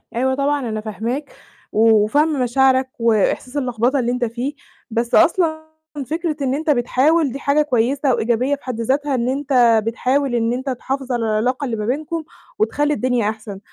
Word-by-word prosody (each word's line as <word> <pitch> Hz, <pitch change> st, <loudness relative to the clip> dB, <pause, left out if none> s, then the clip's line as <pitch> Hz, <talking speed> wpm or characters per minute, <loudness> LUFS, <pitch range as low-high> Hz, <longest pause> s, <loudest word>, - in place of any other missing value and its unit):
أيوة 260 Hz, +2 st, +1 dB
طبعًا 280 Hz, -2 st, 0 dB
أنا 215 Hz, -1 st, -3 dB
فاهماك، 230 Hz, +7 st, -4 dB, 0.4 s
و 220 Hz, -1 st, +4 dB
وفاهمة 290 Hz, +4 st, +1 dB
مشاعرك 260 Hz, +1 st, +2 dB
وإحساس 230 Hz, +4 st, +1 dB
اللخبطة 250 Hz, 0 st, 0 dB
اللي 240 Hz, -1 st, 0 dB
أنت 250 Hz, 0 st, 0 dB
فيه، 240 Hz, +5 st, -4 dB, 0.4 s
بس 235 Hz, +1 st, 0 dB
أصلًا 320 Hz, -2 st, +2 dB, 0.3 s
فكرة 320 Hz, +3 st, -2 dB
إن 265 Hz, -2 st, 0 dB
أنت 310 Hz, +3 st, -2 dB
بتحاول 280 Hz, +3 st, +2 dB
دي 275 Hz, -, -6 dB
حاجة 280 Hz, +2 st, +2 dB
كويسة 265 Hz, 0 st, +1 dB
وإيجابية 240 Hz, +5 st, +1 dB
في 280 Hz, -, -20 dB
حد 245 Hz, -3 st, -4 dB
ذاتها 275 Hz, +4 st, 0 dB
إن 245 Hz, 0 st, 0 dB
أنت 255 Hz, -5 st, +3 dB
بتحاول 255 Hz, +3 st, 0 dB
إن 230 Hz, 0 st, +1 dB
أنت 260 Hz, +2 st, -3 dB
تحافظ 265 Hz, +1 st, -4 dB
على 240 Hz, -2 st, 0 dB
العلاقة 240 Hz, +6 st, 0 dB
اللي 240 Hz, -4 st, -2 dB
ما 210 Hz, -1 st, -4 dB
بينكم، 310 Hz, +7 st, -2 dB, 0.4 s
وتخلّي 295 Hz, -8 st, +1 dB
الدنيا 250 Hz, -6 st, 0 dB
أحسن. 215 Hz, -2 st, -7 dB
255 Hz, 170 wpm, -20 LUFS, 235-285 Hz, 0.4 s, و